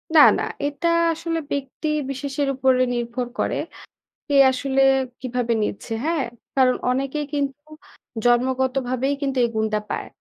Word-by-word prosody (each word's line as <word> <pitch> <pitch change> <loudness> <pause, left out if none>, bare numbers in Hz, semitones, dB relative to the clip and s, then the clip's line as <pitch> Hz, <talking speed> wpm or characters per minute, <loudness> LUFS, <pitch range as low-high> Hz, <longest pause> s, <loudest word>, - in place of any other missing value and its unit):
না, - - +9 0.2
না। - - -1 0.2
এটা 290 +4 -1 0.3
আসলে 330 0 -3
ব্যক্তি 280 +2 -3 0.2
বিশেষের 280 +1 -2
উপরে 260 -1 +3
নির্ভর 240 +1 -3
করে। - - 0 0.7
কে 285 - 0 0.2
আসলে 270 +1 0 0.4
কিভাবে 245 -2 -1
নিচ্ছে, 210 - -5
হ্যাঁ? 325 -3 +1 0.3
কারণ 255 -2 +4
অনেকেই 275 +3 -1
কিন্তু 285 0 -2 0.6
জন্মগতভাবেই 255 +1 +1
কিন্তু 270 -2 -1
এই 235 - +2
গুণটা 220 -1 0
পায়। - - -3
265 Hz, 130 wpm, -22 LUFS, 250-280 Hz, 0.7 s, না